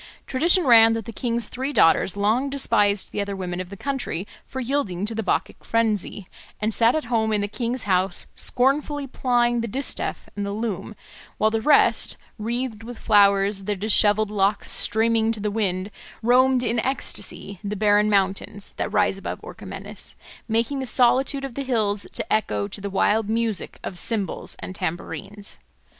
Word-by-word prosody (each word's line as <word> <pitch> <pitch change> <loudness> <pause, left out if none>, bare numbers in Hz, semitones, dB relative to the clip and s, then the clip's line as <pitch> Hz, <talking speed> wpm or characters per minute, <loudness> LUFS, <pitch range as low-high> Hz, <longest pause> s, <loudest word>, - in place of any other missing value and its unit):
Tradition 340 +6 +3
ran 225 -3 +7
that 225 -2 -3
the - - -6
king's 235 -1 -2
three 265 +3 -4
daughters 180 - +3
long 220 +7 +1
despised 210 -7 +1
the 205 - -2
other 200 0 -3
women 180 -1 -4
of 180 - -8
the 200 - -9
country 265 -8 -3 0.2
for 265 - -6
yielding 235 -8 -1
to 220 - -2
the 225 - -2
Bacchic 210 - -2
frenzy, 215 -4 -1 0.3
and 215 +1 -1
sat 230 +4 +4
at 315 - -1
home 225 -2 0
in 210 -1 +1
the 205 - -1
king's 240 +3 -2
house 185 -2 +2
scornfully 280 +3 +1
plying 240 -2 +1
the 230 - -3
distaff 270 +6 -2
and 205 - -3
the 200 0 -3
loom, 215 -1 -4 0.4
while 215 0 +2
the 225 0 0
rest, 295 +5 +3 0.2
wreathed 230 0 -3
with 235 +1 -9
flowers, 200 -2 +3
their 210 0 -1
dishevelled 210 +1 +2
locks 200 0 +1
streaming 225 +1 +2
to 220 - -6
the 210 0 -2
wind, 200 -2 -2 0.3
roamed 255 +2 +4
in 235 0 0
ecstasy 210 -6 -2
the 205 +1 -3
barren 210 0 +3
mountains 200 0 -1
that - - -2
rise 205 -2 +1
above - - -5
Orchomenus, - - -8 0.3
making 230 +5 0
the 265 - -4
solitude 265 +3 +2
of 270 - -7
the 280 - -4
hills 215 -6 -1
to - - -2
echo 105 - 0
to 200 - -6
the 200 - -4
wild 205 +2 +1
music 225 -2 -1
of 180 - -5
cymbals 210 -2 -3
and 185 - -7
tambourines. 200 +4 -5
220 Hz, 175 wpm, -23 LUFS, 200-245 Hz, 0.4 s, ran